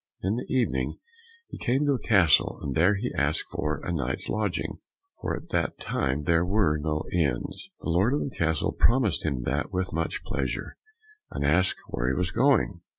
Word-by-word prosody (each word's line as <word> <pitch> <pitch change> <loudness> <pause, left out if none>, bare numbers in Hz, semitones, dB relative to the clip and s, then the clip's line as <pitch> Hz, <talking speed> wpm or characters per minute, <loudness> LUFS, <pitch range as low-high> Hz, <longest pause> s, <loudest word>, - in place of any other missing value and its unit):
In 100 +5 0
the 125 - -6
evening 105 - 0 0.5
he - - -9
came 135 +3 +1
to 145 - +3
a 130 - -1
castle, 90 - +4
and 70 - -2
there 90 +8 +4
he 120 +6 -3
asked 70 +2 +1
for 75 -1 -2
a 90 - -2
night's 65 -5 -2
lodging, 105 -4 -2 0.4
for - - -1
at - - -12
that - - -1
time 70 +3 -1
there 85 +2 +3
were 90 -5 +2
no 75 0 -1
inns. 80 - -1
The - - -4
lord 95 +11 +3
of - - -1
the 135 - -4
castle 80 -2 +1
promised 115 -6 +2
him 70 -6 -1
that 75 +8 -1
with 90 -2 -2
much 80 +1 -2
pleasure, - - -3 0.5
and - - -3
asked 90 +6 +3
where - - -2
he 65 - +1
was 90 -1 0
going? 115 -6 +2
85 Hz, 190 wpm, -27 LUFS, 75-105 Hz, 0.5 s, castle